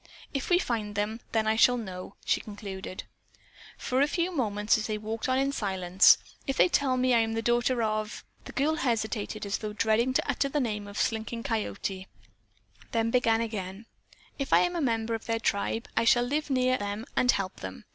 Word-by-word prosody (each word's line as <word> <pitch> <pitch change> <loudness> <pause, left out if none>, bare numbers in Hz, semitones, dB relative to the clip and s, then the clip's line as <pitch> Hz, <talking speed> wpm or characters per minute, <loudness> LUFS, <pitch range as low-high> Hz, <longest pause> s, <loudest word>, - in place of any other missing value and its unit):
"If 275 -2 -3
we 350 - +5
find 220 - -2
them, 210 +2 -1
then 220 -1 +1
I 220 0 +2
shall 245 +2 +5
know," 190 -3 -7
she - - +2
concluded. 200 -3 -7 0.7
For 255 +1 0
a 285 - +4
few 345 +3 -1
moments 210 -5 +1
they 215 -1 -2
walked 220 +3 -4
on 255 - +2
in 275 +1 +1
silence. 190 -6 +4 0.3
"If 270 - -1
they - - +5
tell 270 -6 +2
me 255 0 +3
I 235 - +5
am 225 0 0
the 225 0 -2
daughter 240 +1 +2
of 215 0 -2
" - - -33
The - - -8
girl 305 +3 +1
hesitated 220 -5 -1
as 200 0 -2
though 210 -1 -5
dreading 225 +3 +2
to - - +1
utter 275 - 0
the 295 - 0
name 210 -5 -2
of 205 0 -9
Slinking 225 +1 -1
Coyote, 195 -4 -3 0.9
then 230 0 +1
began 230 -2 +3
again, 205 -2 -5 0.5
"If 275 - -1
I - - +7
am 355 0 0
a 340 - -1
member 230 -4 0
of 225 - -4
their 225 0 0
tribe, 225 +1 -1
I - - +3
shall 240 +1 +5
live 295 +5 -1
near 255 -1 +2
them 205 +2 -4
and 250 - +2
help 195 -4 +1
them. 95 -7 -8
225 Hz, 205 wpm, -28 LUFS, 210-255 Hz, 0.9 s, I